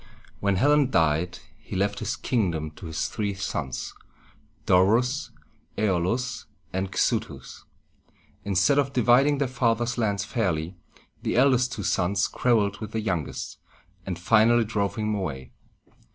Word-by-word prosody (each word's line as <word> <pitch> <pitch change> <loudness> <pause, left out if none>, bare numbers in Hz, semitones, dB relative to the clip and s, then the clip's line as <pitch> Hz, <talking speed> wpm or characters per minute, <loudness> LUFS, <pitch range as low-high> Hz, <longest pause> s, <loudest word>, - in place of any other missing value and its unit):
When 100 -1 +1
Hellen 145 +5 +3
died, 80 - +1 0.2
he - - -8
left 100 +2 0
his - - -2
kingdom 85 -10 -1
to 85 +3 -10
his 80 0 -2
three 100 -2 -3
sons, 90 -9 -4 0.7
Do´rus, 115 +8 +3 0.5
Æ´o 95 -5 +1
lus, 120 +5 -2 0.3
and 95 +1 -2
Xu´thus. - - -2 0.8
Instead 100 +9 +3
of 135 -1 0
dividing 130 +4 +4
their 140 -1 0
father's 120 -1 0
lands 100 -3 0
fairly, 90 - -1 0.5
the - - -1
eldest 125 0 +3
two 105 - -5
sons 100 +1 +1
quarreled 105 -5 +1
with 110 -1 -7
the 110 - -1
youngest, 90 -8 -3 0.4
and 90 -2 -4
finally 115 +5 +4
drove 100 -2 -1
him 110 -1 -1
away. 75 -11 -4
105 Hz, 135 wpm, -25 LUFS, 90-120 Hz, 0.8 s, dividing